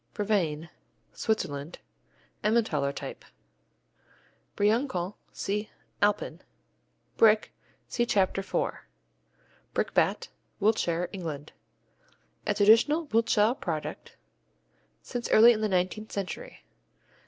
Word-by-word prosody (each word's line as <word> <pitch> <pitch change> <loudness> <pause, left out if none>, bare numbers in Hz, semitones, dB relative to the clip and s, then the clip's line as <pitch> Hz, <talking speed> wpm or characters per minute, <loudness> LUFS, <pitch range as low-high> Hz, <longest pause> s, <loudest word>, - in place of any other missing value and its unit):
Brevine 175 -7 0 0.4
Switzerland 155 -9 -2 0.7
Emmentaler 210 -11 +1
type. - - -7 1.3
Briançon 205 -3 +1 0.2
see 210 +2 -3 0.3
Alpin. 205 0 +1 0.8
Brick 215 -1 +5 0.4
see 240 -1 0
Chapter 195 -2 +2
4. 195 - -3 0.9
Brickbat - - +1 0.3
Wiltshire, 180 -5 +1
England 160 -6 -6 0.9
A - - +1
traditional 230 +10 +5
Wiltshire 225 0 +3
product - - -5 0.9
since 245 -1 -4
early 235 +2 +8
in 215 - -3
the 215 -2 0
eighteenth 185 +5 -1
century. 200 - -6
210 Hz, 85 wpm, -28 LUFS, 180-225 Hz, 1.3 s, early